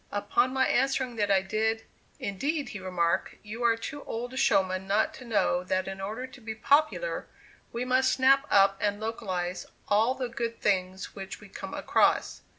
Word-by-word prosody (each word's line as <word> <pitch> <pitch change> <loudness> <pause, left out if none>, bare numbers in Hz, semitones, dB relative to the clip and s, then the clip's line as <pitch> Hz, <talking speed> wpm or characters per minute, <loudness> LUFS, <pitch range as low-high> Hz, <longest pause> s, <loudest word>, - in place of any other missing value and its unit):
Upon 395 -10 +1
my 265 0 +2
answering 260 -1 +1
that 205 -1 +1
I 195 -1 +4
did, 220 +3 0 0.4
"indeed," 275 +7 -2
he 210 - -6
remarked, 180 -3 0
"you 220 +3 -6
are 230 -1 +4
too 290 +5 -6
old 245 +2 -5
a - - -7
showman 190 -6 +2
not 215 +11 +2
to 260 -5 -11
know 205 -5 +1
that 185 0 -1
in 195 0 -5
order 215 +6 -4
to 260 -1 -14
be 220 -1 -5
popular, 305 - +1 0.4
we 235 +2 -3
must 260 +1 +3
snap 270 +2 +4
up 195 0 +4
and 205 0 0
localize 190 -5 -3 0.2
all 220 +5 +3
the 255 -2 -3
good 235 -1 -4
things 190 -1 -1
which 195 -1 -7
we 205 - -14
come - - -7
across." - - +2
220 Hz, 180 wpm, -28 LUFS, 195-260 Hz, 0.4 s, I